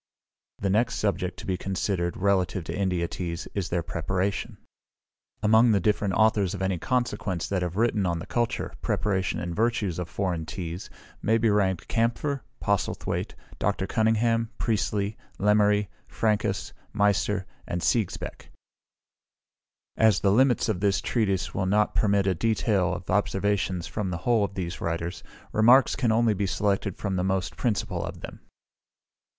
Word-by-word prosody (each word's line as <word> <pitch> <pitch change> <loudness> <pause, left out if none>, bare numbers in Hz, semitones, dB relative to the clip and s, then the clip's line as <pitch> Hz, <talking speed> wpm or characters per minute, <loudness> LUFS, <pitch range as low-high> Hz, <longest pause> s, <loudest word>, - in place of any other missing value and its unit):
The 100 -1 -1
next 115 +5 +2
subject 95 -3 -1
to - - -9
be 95 -1 -1
considered, 95 -2 -2
relative 95 -2 +1
to - - -5
India 90 -3 0
teas, 85 0 -5
is 95 -3 -2
their 85 -1 0
Preparation. 95 +4 -2 0.9
Among 110 +2 +5
the 100 - +3
different 100 0 +1
authors 105 -4 +3
of 95 - -6
any 95 -2 0
consequence 115 -4 -1
that 95 -2 -1
have 90 -1 -2
written 110 -4 +2
on 85 -1 0
the 85 - -6
culture, 120 +1 -1
preparation, 100 -4 0
and 85 0 -4
virtues 110 -6 0
of 90 -2 -4
foreign 85 -3 -2
teas, 85 0 -5 0.3
may 110 +1 +3
be 115 -1 +2
ranked 95 -4 +1
Kampfer, 120 +5 0 0.2
Postlethwaite, 100 -2 -1 0.2
Dr. 95 0 0
Cunningham, 115 +1 +1
Priestley, 105 -1 -1 0.2
Lemery, 105 0 +3 0.2
Franchus, 105 -4 -1 0.2
Meister, 105 -1 +1 0.2
and 85 - -2
Sigesbeck; 110 -1 -1 1.5
as 110 -5 +4
the 100 - +3
limits 125 +3 +3
of 105 -5 0
this 100 0 +2
Treatise 95 -6 0
will 95 -1 -1
not 105 +2 +2
permit 100 -2 +2
a 95 - +2
detail 100 -1 +1
of 90 0 -5
observations 95 -2 0
from 105 -3 -3
the 85 - -2
whole 120 -4 +3
of 100 -1 -3
these 90 -2 -4
writers, 85 0 -3 0.3
remarks 120 +5 +5
can 120 -4 +1
only 115 0 +3
be 100 0 -1
selected 100 -1 0
from 95 -3 -2
the 90 - 0
most 95 -2 -1
principal 115 -5 -1
of - - -7
them. - - -8
100 Hz, 155 wpm, -26 LUFS, 90-110 Hz, 1.5 s, Among